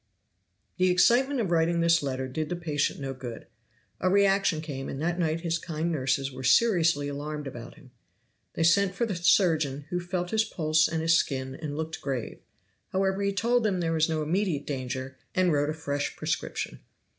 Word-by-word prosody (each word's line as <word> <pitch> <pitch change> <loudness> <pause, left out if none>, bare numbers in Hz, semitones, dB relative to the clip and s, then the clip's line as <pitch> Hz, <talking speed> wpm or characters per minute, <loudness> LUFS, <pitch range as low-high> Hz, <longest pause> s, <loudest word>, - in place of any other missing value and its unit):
The 185 0 +3
excitement 245 +9 +4
of 190 -6 -2
writing 170 0 +2
this 170 0 +4
letter 130 -2 -3
did 150 +4 -3
the 175 - -1
patient 155 -5 -1
no 135 -1 -4
good. 125 -3 -8 0.5
A 185 - +1
reaction 195 -3 +3
came, 140 -4 -5
and 135 - -5
that 175 +3 -1
night 165 -1 0
his 165 -1 -1
kind 165 0 -3
nurses 135 -2 0
were 130 0 -8
seriously 165 - +3
alarmed 150 +1 -5
about 120 -3 -8
him. 130 - -18 0.6
They 165 - -1
sent 190 +3 +3
for 235 - 0
the 210 -5 -3
surgeon, 160 -5 +2
who 180 - 0
felt 175 0 -3
his 220 0 +3
pulse 155 -5 +2
and 160 0 -2
his 165 0 +4
skin 130 -4 -1
and 145 0 -6
looked 160 0 -4
grave. 130 -4 -4 0.5
However, 190 +1 0
he 200 0 +1
told 235 +5 +2
them 200 -4 +1
there 165 -1 0
was 160 0 +2
no 155 -1 0
immediate 165 -2 -1
danger, 130 -1 -4 0.2
and 185 -3 +3
wrote 145 0 +1
a - - -1
fresh 145 -2 -3
prescription. - - -3
160 Hz, 190 wpm, -27 LUFS, 145-180 Hz, 0.6 s, excitement